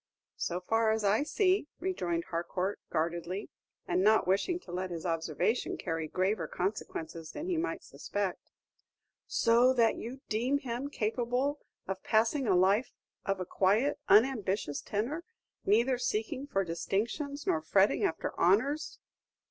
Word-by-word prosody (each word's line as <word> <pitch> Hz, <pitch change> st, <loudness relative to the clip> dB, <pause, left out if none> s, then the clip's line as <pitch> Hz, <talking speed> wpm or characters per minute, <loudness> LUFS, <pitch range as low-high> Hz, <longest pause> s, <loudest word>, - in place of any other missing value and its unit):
"So 175 Hz, +1 st, -2 dB
far 225 Hz, +4 st, +2 dB
as 220 Hz, 0 st, +1 dB
I 205 Hz, +4 st, +3 dB
see," 370 Hz, +2 st, +2 dB
rejoined 180 Hz, -, -1 dB
Harcourt, 180 Hz, +3 st, -2 dB
guardedly, 170 Hz, +4 st, -2 dB, 0.4 s
and 180 Hz, +1 st, +1 dB
not 215 Hz, +2 st, +5 dB
wishing 205 Hz, -, +1 dB
to 175 Hz, -, -11 dB
let 185 Hz, +1 st, -3 dB
his 170 Hz, -1 st, -5 dB
observation 165 Hz, -, 0 dB
carry 165 Hz, -1 st, -3 dB
graver 190 Hz, +6 st, 0 dB
consequences 165 Hz, -4 st, -4 dB
than 300 Hz, -, -5 dB
he 365 Hz, -1 st, 0 dB
might 330 Hz, +2 st, -2 dB
suspect. 200 Hz, -3 st, -4 dB, 0.8 s
"So 240 Hz, +2 st, +4 dB
that 230 Hz, -3 st, +3 dB
you 255 Hz, +4 st, -7 dB
deem 245 Hz, +6 st, +1 dB
him 260 Hz, 0 st, -4 dB
capable 250 Hz, +4 st, -1 dB, 0.3 s
of 190 Hz, 0 st, -3 dB
passing 230 Hz, +5 st, +2 dB
a 190 Hz, -, +4 dB
life 195 Hz, +7 st, +3 dB, 0.3 s
of 195 Hz, -1 st, 0 dB
a 185 Hz, -, -3 dB
quiet, 205 Hz, +12 st, +2 dB
unambitious 205 Hz, -, +3 dB
tenor, 245 Hz, +11 st, -2 dB, 0.4 s
neither 235 Hz, +5 st, +3 dB
seeking 250 Hz, +4 st, -2 dB
for 195 Hz, -8 st, +1 dB
distinctions 230 Hz, -, -2 dB
nor 160 Hz, -, +1 dB
fretting 190 Hz, +5 st, +3 dB
after -, -, -1 dB
honors?" 255 Hz, -, +2 dB
215 Hz, 140 wpm, -31 LUFS, 185-260 Hz, 0.8 s, not